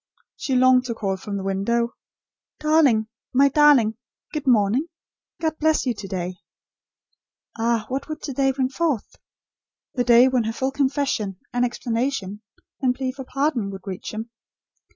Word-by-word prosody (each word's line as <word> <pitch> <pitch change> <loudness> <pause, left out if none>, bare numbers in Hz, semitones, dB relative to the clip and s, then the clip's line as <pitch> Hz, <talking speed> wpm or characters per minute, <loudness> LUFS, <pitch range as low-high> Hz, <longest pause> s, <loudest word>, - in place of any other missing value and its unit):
She 265 - -2
longed 255 0 +5
to 235 -2 -3
call 195 -3 -1
from 200 +1 -5
the 195 - -4
window; 235 +5 0 0.7
"Darling 305 -8 +4 0.3
my 275 +2 +5
Darling! 275 -7 +5 0.4
Good 300 -3 -4
morning! 235 +5 +3 0.5
God 315 -1 -2
bless 315 -1 +2
you 250 - +1
to 205 -2 -8
day." 180 -1 -4 1.2
Ah 230 -1 0
what 270 +4 -4
would 310 0 -6
to 275 - -4
day 270 +1 +2
bring 260 -1 -1
forth; 290 -5 -2 0.8
the 250 - 0
day 245 +1 +6
when 255 -3 +1
her 225 - -2
full 265 +3 -1
confession, 270 -8 -1 0.2
and 245 0 +1
explanation, 235 -4 -2 0.4
and 255 -2 +2
plea 260 -1 -2
for 265 0 -9
pardon, 275 -6 -1
would 195 -1 -9
reach 190 -2 -6
him? 220 +2 -6
250 Hz, 155 wpm, -23 LUFS, 215-275 Hz, 1.2 s, day